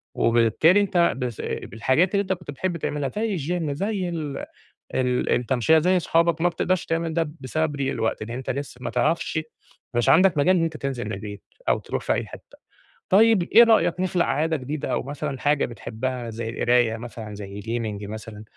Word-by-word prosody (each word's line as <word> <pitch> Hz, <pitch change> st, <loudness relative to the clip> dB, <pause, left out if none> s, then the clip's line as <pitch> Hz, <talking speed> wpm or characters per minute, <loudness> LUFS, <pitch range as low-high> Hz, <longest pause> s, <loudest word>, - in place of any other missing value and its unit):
وبالتالي 120 Hz, -, +4 dB
أنت 175 Hz, -4 st, +2 dB
بس 125 Hz, -4 st, -4 dB
بالحاجات 130 Hz, +10 st, 0 dB
اللي 200 Hz, -, +3 dB
أنت 190 Hz, -1 st, -1 dB
كنت 175 Hz, -5 st, -8 dB
بتحب 170 Hz, +5 st, -2 dB
تعملها 145 Hz, -3 st, -2 dB
زي 210 Hz, -3 st, -1 dB
الgym، 165 Hz, +1 st, -2 dB
زي 190 Hz, +4 st, -2 dB
ال 155 Hz, -5 st, -4 dB, 0.6 s
ال 125 Hz, -1 st, +1 dB
التَمشِية، 125 Hz, +5 st, +3 dB
زي 180 Hz, +4 st, +3 dB
صحابك 165 Hz, -1 st, +2 dB
ما 175 Hz, -, +4 dB
بتقدرش 175 Hz, +1 st, -1 dB
تعمل 165 Hz, 0 st, -1 dB
ده 165 Hz, -2 st, 0 dB
بسبب 145 Hz, +3 st, -1 dB
ضِيق 135 Hz, -1 st, -1 dB
الوقت 110 Hz, -, -2 dB
إن 110 Hz, -, -6 dB
أنت 125 Hz, +2 st, -5 dB
لسّه 140 Hz, -1 st, -4 dB
ما -, -, -3 dB
تعرفش 160 Hz, +6 st, 0 dB, 0.6 s
مش 120 Hz, 0 st, +1 dB
عندك 185 Hz, -1 st, +5 dB
مجال 185 Hz, +6 st, +4 dB
إن 170 Hz, -, +2 dB
أنت 160 Hz, -1 st, -3 dB
تنزِل 135 Hz, -4 st, -3 dB
من 105 Hz, -, -4 dB
البيت 105 Hz, -2 st, -7 dB, 0.3 s
أو -, -, +3 dB
تروح -, -, -4 dB
في -, -, +1 dB
أي -, -, -1 dB
حتّة. -, -, -14 dB, 0.5 s
طيب 215 Hz, 0 st, +5 dB
إيه 230 Hz, +6 st, +7 dB
رأيك 185 Hz, -7 st, +3 dB
نخلق 180 Hz, -1 st, +1 dB
عادة 160 Hz, +2 st, 0 dB
جديدة 140 Hz, +2 st, -4 dB
أو -, -, -1 dB
مثلًا 140 Hz, 0 st, -5 dB
حاجة 145 Hz, +1 st, +2 dB
بتحبّها 120 Hz, +1 st, -5 dB
زي 115 Hz, 0 st, -5 dB
القراية 120 Hz, -1 st, +2 dB
مثلًا، 115 Hz, -2 st, -8 dB
زي 100 Hz, 0 st, -7 dB
gaming 110 Hz, -2 st, -4 dB
مثلًا، 110 Hz, 0 st, -8 dB
145 Hz, 185 wpm, -24 LUFS, 120-170 Hz, 0.6 s, إيه